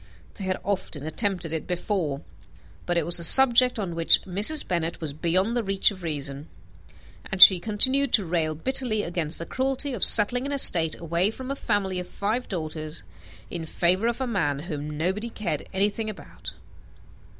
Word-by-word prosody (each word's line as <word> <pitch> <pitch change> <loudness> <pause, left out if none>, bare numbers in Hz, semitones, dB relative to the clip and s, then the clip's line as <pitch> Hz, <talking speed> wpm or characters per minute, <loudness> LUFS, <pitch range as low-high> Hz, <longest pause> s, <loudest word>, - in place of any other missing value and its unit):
They 195 - -9
had 185 0 -3
often 185 -7 -4
attempted 175 0 -3
it 160 - -5
before: 175 -5 -4 0.7
but 175 - -1
it 165 - -1
was 175 +1 +4
a - - 0
subject 250 +5 +7
on 190 -5 -5
which 165 0 +3
Mrs. 210 - +2
Bennet 170 -2 -3
was 155 -4 -4
beyond 185 +9 -1
the 240 - 0
reach 195 -2 +2
of 190 -2 -12
reason; 145 -2 -5 0.8
and 190 - -4
she 185 0 +9
continued 260 +7 +2
to 205 - +3
rail 160 -2 -2
bitterly 245 - 0
against 170 -2 -2
the 165 - -5
cruelty 265 - -2
of 225 - -3
settling 245 +5 +5
an 285 - -4
estate 165 - +3
away 170 +3 -1
from 260 +4 -8
a - - -4
family 200 -7 -3
of 180 - -8
five 220 +7 -4
daughters, 155 - -6 0.5
in 165 -2 -7
favour 185 +7 0
of 235 +1 -3
a 260 - -2
man 175 - -2
whom 150 -1 -7
nobody 190 +8 -3
cared 205 -10 -6
anything 205 +3 -2
about. 210 - -10
185 Hz, 175 wpm, -24 LUFS, 165-225 Hz, 0.8 s, she